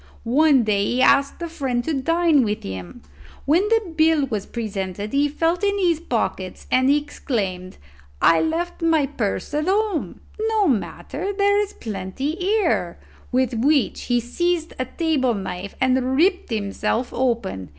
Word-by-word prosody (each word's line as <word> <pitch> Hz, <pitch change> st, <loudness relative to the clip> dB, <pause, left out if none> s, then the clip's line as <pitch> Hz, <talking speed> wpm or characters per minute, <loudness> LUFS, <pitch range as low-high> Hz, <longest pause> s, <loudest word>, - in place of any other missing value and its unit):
One 275 Hz, +2 st, +4 dB
day 205 Hz, -2 st, +1 dB
he 245 Hz, +5 st, 0 dB
asked 280 Hz, 0 st, +3 dB
a -, -, -2 dB
friend 265 Hz, -7 st, -2 dB
to 320 Hz, -, -2 dB
dine 325 Hz, +1 st, +3 dB
with 210 Hz, -1 st, -2 dB
him; 90 Hz, -4 st, -8 dB, 0.4 s
when 340 Hz, +8 st, +3 dB
the 445 Hz, -7 st, +1 dB
bill 315 Hz, -2 st, +3 dB
was 215 Hz, -6 st, -4 dB
presented 205 Hz, -3 st, -4 dB
he 285 Hz, +1 st, +2 dB
felt 330 Hz, +5 st, 0 dB
in 405 Hz, 0 st, +2 dB
his 345 Hz, -5 st, +2 dB
pockets, 220 Hz, -, -3 dB
and 260 Hz, +1 st, +3 dB
exclaimed, 220 Hz, -11 st, -2 dB, 0.4 s
'I 165 Hz, -, +5 dB
left 340 Hz, +3 st, -2 dB
my 325 Hz, -3 st, +3 dB
purse 245 Hz, -3 st, -3 dB
at 305 Hz, +3 st, -1 dB
home. 400 Hz, -3 st, -1 dB, 0.2 s
No 440 Hz, -2 st, +1 dB
matter; 280 Hz, -, -2 dB
there 405 Hz, 0 st, +3 dB
is 415 Hz, -1 st, -2 dB
plenty 210 Hz, +6 st, -4 dB
here;' 365 Hz, -, 0 dB, 0.3 s
with 255 Hz, -1 st, +1 dB
which 275 Hz, +4 st, +1 dB
he 245 Hz, -1 st, +2 dB
seized 335 Hz, +7 st, -1 dB
a 255 Hz, -, 0 dB
table 265 Hz, -4 st, 0 dB
knife 190 Hz, 0 st, -6 dB
and 260 Hz, 0 st, +1 dB
ripped 365 Hz, +4 st, +2 dB
himself 220 Hz, +2 st, -2 dB
open. 230 Hz, -, -1 dB
275 Hz, 150 wpm, -22 LUFS, 220-330 Hz, 0.4 s, I